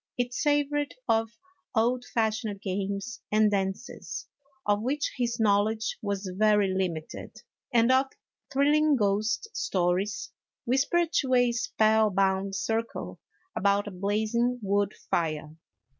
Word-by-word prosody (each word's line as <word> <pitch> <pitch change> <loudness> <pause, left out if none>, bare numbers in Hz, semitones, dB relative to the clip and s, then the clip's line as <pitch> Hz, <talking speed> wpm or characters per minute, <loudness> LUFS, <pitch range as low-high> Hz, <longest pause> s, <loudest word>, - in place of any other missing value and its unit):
It 245 0 -1
savored 290 +1 0
of 225 0 +2 0.5
old 245 +2 +2
fashioned 220 -2 -1
games 200 +4 -3
and 215 0 +4
dances 195 +3 -3 0.4
(of 205 0 +2
which 280 +5 -1
his 240 -2 -1
knowl 205 -1 +4
edge 220 0 -3
was 200 -1 -3
very 210 -2 +3
limited), 175 -5 -4 0.3
and 235 0 +4
of 260 +1 +4 0.4
thrilling 295 +2 +4
ghost 215 - 0
stories 185 +3 -1 0.3
whispered 285 +7 +1
to 260 -2 +1
a 245 -1 +4
spellbound 200 -4 +2
circle 225 +3 -3 0.4
about 200 +1 +2
a - - -5
blazing 215 +6 0
wood 200 0 +1 0.2
fire. 155 -2 -1
215 Hz, 115 wpm, -28 LUFS, 200-245 Hz, 0.5 s, and